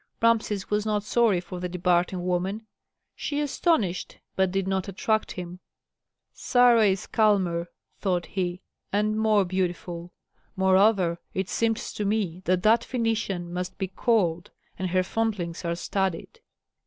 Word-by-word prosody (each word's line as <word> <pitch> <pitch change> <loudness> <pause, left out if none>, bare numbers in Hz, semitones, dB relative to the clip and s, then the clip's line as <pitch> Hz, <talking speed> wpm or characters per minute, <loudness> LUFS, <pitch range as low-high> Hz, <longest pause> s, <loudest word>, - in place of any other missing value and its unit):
Rameses 220 -4 +1
was 210 0 +2
not 210 -1 0
sorry 220 -4 +3
for 180 +1 -7
the 180 0 -3
departing 180 0 +1
woman; 185 +4 -1 0.5
she 290 -1 -3
astonished, 290 - 0 0.2
but 190 -1 +2
did 190 0 -1
not 190 0 -1
attract 215 +3 -1
him. 180 -1 -7 0.7
"Sarah 240 -3 +4
is 190 -1 0
calmer," 190 -6 +2 0.3
thought 180 -3 0
he, 180 -1 -3 0.3
"and 210 +1 +1
more 215 -2 +3
beautiful. 175 -1 -3 0.4
Moreover, 190 -2 +3 0.2
it 190 0 -1
seems 225 -1 -1
to 210 - -3
me 200 -4 -1
that 180 0 +1
that 225 +2 +5
Phœnician 225 -7 -2
must 180 +1 -4
be 190 - -3
cold, 180 -5 +1 0.3
and 185 -1 -1
her 185 +1 +2
fondlings 190 -5 -2
are 170 0 -1
studied." 190 0 -2
190 Hz, 140 wpm, -26 LUFS, 180-215 Hz, 0.7 s, that